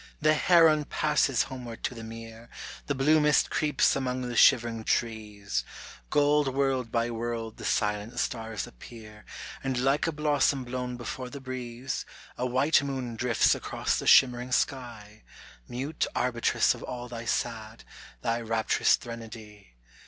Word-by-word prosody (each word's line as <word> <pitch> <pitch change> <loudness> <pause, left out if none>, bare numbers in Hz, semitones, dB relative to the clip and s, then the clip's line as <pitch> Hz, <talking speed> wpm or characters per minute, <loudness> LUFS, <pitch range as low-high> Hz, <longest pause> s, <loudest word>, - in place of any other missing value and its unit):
The 155 0 +4
heron 155 -2 +5
passes 150 -4 +1
homeward 125 -3 -8
to 130 - -2
the 115 -2 -9
mere, 115 +1 -10 0.4
The 145 - -1
blue 150 +4 +4
mist 150 0 +3
creeps 150 -3 +2
among 130 -2 -2
the 120 -1 -4
shivering 115 -1 +4
trees, 105 - -2 0.5
Gold 145 0 +3
world 135 -4 0
by 115 0 0
world 115 -1 -4
the - - -8
silent 105 +3 -1
stars 115 -4 -3
appear, 105 - -13 0.4
And 135 -2 -1
like 135 +5 +1
a - - 0
blossom 145 -3 +1
blown 125 0 -4
before 125 +1 -6
the 140 - -8
breeze, 130 -1 -5 0.3
A 125 - -2
white 130 +6 +3
moon 130 -4 -4
drifts 115 0 +3
across - - -2
the - - -5
shimmering 125 -1 +5
sky, 115 -6 -2 0.5
Mute 135 +6 -3
arbitress 120 -2 +2
of - - -11
all 125 -1 -6
thy 120 -1 -7
sad, 115 -1 -3 0.4
thy 115 +1 0
rapturous 110 -1 +2
threnody. 110 - -10
125 Hz, 145 wpm, -28 LUFS, 115-135 Hz, 0.5 s, heron